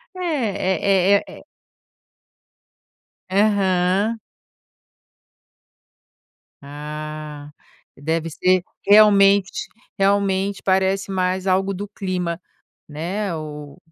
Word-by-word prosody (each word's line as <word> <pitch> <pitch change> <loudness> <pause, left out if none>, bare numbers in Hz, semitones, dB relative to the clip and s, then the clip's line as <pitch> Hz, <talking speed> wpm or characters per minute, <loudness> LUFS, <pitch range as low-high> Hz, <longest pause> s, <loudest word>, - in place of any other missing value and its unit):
É 200 - +1
é - - -12
é - - -11
é - - -19 1.9
Aham. 195 +1 +2 2.5
Ah, 150 0 -7 0.5
deve 160 +3 -2
ser 185 +3 +2 0.3
realmente 200 -2 +5 0.3
realmente 195 0 +1
parece 190 +1 +1
mais 185 0 -1
algo 190 +1 +1
do 205 +2 -6
clima, 180 -4 -3 0.5
né, 175 +5 -3
o 150 -2 -8
190 Hz, 75 wpm, -21 LUFS, 165-200 Hz, 2.5 s, realmente